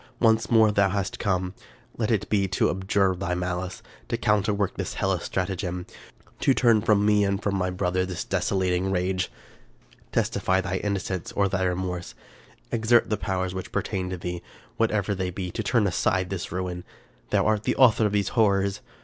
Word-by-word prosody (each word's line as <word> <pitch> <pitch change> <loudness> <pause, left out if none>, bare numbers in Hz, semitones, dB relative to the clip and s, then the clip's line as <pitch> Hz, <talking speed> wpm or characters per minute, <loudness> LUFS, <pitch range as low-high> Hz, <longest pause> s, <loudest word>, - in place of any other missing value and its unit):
once 115 -1 +3
more 110 -2 +5
hast 100 -1 +1
thou - - -5
come? 95 -3 0 0.4
Let 110 -2 -1
it 110 -5 +1
be 100 -2 +1
to 95 - +1
abjure 95 0 +1
thy 90 -1 -2
malice; 90 +1 -3 0.2
to 115 - -1
counterwork 105 -3 +1
this - - -4
hellish 95 -2 0
stratagem; 90 -1 -2 0.5
to 135 - +3
turn 115 -4 +4
from 105 -1 +3
me 105 -1 +4
and 100 -1 0
from 100 -1 -1
my 90 -1 0
brother 90 0 0
this 90 -3 -4
desolating 95 -1 0
rage! 95 0 -1 0.4
" - - -30
Testify 95 0 +1
thy 95 0 -2
innocence 95 -3 -3
or 100 -1 +2
thy 95 -1 0
remorse; 90 -1 -3 0.6
exert 115 0 +3
the - - +3
powers 95 -1 -2
which 95 0 -6
pertain 95 -1 -2
to 95 - -4
thee, 90 0 -5 0.3
whatever 105 -3 +1
they 95 -1 -2
be, 90 0 -5
to - - -3
turn 110 0 +2
aside 90 0 0
this 95 -3 -4
ruin. 90 0 -3 0.5
Thou - - +2
art 110 -1 +2
the - - 0
author 115 -4 +5
of - - -3
these 100 -2 +1
horrors! 100 -3 +2
95 Hz, 180 wpm, -25 LUFS, 90-105 Hz, 0.6 s, more